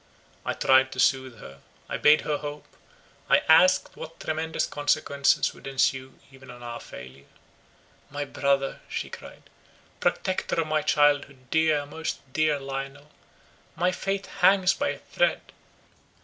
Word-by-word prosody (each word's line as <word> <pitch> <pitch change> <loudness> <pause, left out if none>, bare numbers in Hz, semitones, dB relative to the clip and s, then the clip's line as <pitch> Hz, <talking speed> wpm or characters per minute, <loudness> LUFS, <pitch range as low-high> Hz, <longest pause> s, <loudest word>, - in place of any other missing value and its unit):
I - - -2
tried 130 0 +3
to 130 - -8
soothe 130 -2 +1
her; 70 -8 -12 0.3
I - - -3
bade 150 +1 +5
her 150 -1 -1
hope; 145 0 -7 0.6
I - - +4
asked 185 +4 +5
what 165 - -10
tremendous 160 +1 -2
consequences 140 -1 +1
would - - -12
ensue 130 -1 0 0.2
even 130 -1 -15
on 120 -1 -11
our 120 0 -6
failure. 65 +2 -12 0.8
"My 145 +1 -4
brother," 140 0 0
she - - -4
cried, - - -11 0.6
"protector 185 -3 -1
of 165 - +1
my 155 0 0
childhood, 145 -3 +1
dear, 155 -2 +2
most 155 +2 -5 0.2
dear 155 -2 +1
Lionel, 135 +2 -7 0.6
my 180 +1 +1
fate 195 +1 -3 0.2
hangs 190 0 +5
by 285 - -1
a - - -4
thread. - - -1
145 Hz, 140 wpm, -26 LUFS, 135-160 Hz, 0.8 s, bade